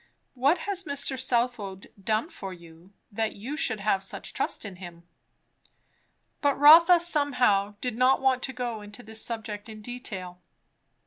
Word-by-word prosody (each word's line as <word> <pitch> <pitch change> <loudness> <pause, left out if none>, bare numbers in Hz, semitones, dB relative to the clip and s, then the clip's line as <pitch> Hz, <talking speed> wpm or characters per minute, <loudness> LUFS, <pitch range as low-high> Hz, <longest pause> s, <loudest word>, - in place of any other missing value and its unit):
"What 275 +7 +2
has 385 -2 +1
Mr. 280 -2 -1
Southwode 235 -6 -2
done 220 - 0
for 195 - -7
you, 170 +1 -16 0.2
that 220 +1 -2
you 245 +9 -6
should 220 -9 -1
have 195 -1 +1
such 195 - -8
trust - - -2
in 195 -3 -8
him?" 170 -2 -11 1.3
But 285 -1 +2
Rotha 335 +5 +8
somehow 250 - +2
did 250 -3 -2
not 255 +2 +4
want 265 -1 +2
to 265 - -3
go 240 -3 -4
into 205 +3 -10
this 220 0 -5
subject 220 -2 -5
in 215 -1 -9
detail. 195 -7 -7
230 Hz, 150 wpm, -27 LUFS, 200-265 Hz, 1.3 s, Rotha